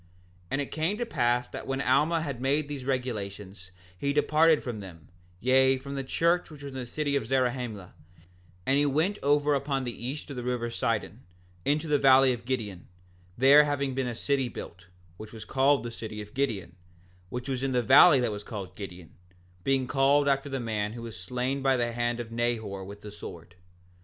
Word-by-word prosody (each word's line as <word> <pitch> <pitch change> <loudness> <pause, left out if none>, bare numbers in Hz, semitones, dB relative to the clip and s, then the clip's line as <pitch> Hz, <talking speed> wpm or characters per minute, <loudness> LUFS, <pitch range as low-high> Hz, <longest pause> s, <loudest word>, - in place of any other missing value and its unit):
6:7 - - -29
And - - -1
now 145 - 0
it - - -10
came 160 +7 -1
to 240 - -2
pass 120 - +1
that - - -7
when 135 0 -2
Alma 150 +5 +2
had 140 -5 -5
made 140 +3 +1
these 140 -3 -6
regulations 105 -7 -4 0.3
he 140 +10 -1
departed 155 +1 +4
from 120 -4 -4
them, 90 -5 -11 0.3
yea, 130 +3 +4
from 140 +2 -8
the 135 -1 -3
church 170 +6 +1
which 150 -2 -12
was 140 -1 -7
in 130 - -5
the 125 - -5
city 145 +2 -1
of 135 -6 -1
Zarahemla, 125 -6 -1 0.7
and 140 +1 +2
went 190 +7 +1
over 145 +1 +3
upon 140 -1 -1
the 120 -2 -4
east 145 +2 -5
of 135 - -7
the 125 - -4
river 120 -1 -2
Sidon, 115 -2 -2 0.4
into 150 +3 +1
the 150 -1 +2
valley 135 -1 +6
of 120 -1 -8
Gideon, 110 -8 -3 0.5
there 140 +4 +7
having 140 -2 -1
been 130 -1 -1
a 120 - -3
city 135 +1 0
built, 90 -5 -9 0.3
which 110 +2 -10
was 110 -1 -9
called 135 +2 +2
the 120 - -5
city 110 -2 -7
of 105 0 -9
Gideon, 105 -11 -2 0.5
which 125 +3 -5
was 130 -2 -2
in 135 0 -1
the 125 -1 +2
valley 140 +4 +8
that 120 - 0
was 105 0 -6
called 95 -5 -7
Gideon, 90 -4 -9 0.5
being 135 -1 +1
called 140 +2 +3
after 140 0 +1
the 135 -1 -3
man 110 -3 -2
who 115 0 -8
was 115 -2 -7
slain 125 +9 -3
by 135 -1 +3
the 120 -1 0
hand 120 0 -1
of 115 -1 -6
Nehor 115 -4 -2
with 100 +2 -10
the 105 - -9
sword. 85 -4 -10
130 Hz, 205 wpm, -28 LUFS, 110-140 Hz, 0.7 s, valley